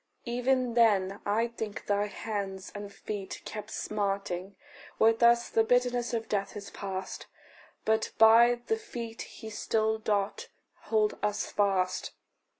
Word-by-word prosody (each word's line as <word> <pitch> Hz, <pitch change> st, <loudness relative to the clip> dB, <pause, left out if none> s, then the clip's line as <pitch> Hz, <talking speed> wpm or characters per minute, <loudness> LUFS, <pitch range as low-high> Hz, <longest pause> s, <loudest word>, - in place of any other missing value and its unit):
Even 250 Hz, 0 st, +1 dB
then, 205 Hz, -4 st, +3 dB
I 220 Hz, +3 st, +2 dB
think, 220 Hz, -3 st, -6 dB
thy 205 Hz, 0 st, +1 dB
hands 200 Hz, -2 st, -5 dB
and 205 Hz, 0 st, -7 dB
feet 200 Hz, -1 st, -6 dB
kept 210 Hz, 0 st, -6 dB
smarting: 195 Hz, -3 st, -2 dB, 0.4 s
With 225 Hz, +1 st, +4 dB
us 235 Hz, 0 st, +5 dB
the 225 Hz, -, +3 dB
bitterness 245 Hz, 0 st, +2 dB
of 225 Hz, -2 st, -2 dB
death 200 Hz, 0 st, -2 dB
is 200 Hz, -1 st, -8 dB
past, 190 Hz, -1 st, -5 dB, 0.6 s
But 220 Hz, 0 st, +2 dB
by 235 Hz, +2 st, +7 dB
the 445 Hz, -, +1 dB
feet 235 Hz, -, -7 dB
he 220 Hz, -1 st, -9 dB
still 220 Hz, +1 st, 0 dB
doth 205 Hz, -2 st, -1 dB, 0.4 s
hold 215 Hz, -1 st, +1 dB
us 210 Hz, 0 st, -1 dB
fast. 195 Hz, -3 st, 0 dB
215 Hz, 135 wpm, -29 LUFS, 200-235 Hz, 0.6 s, by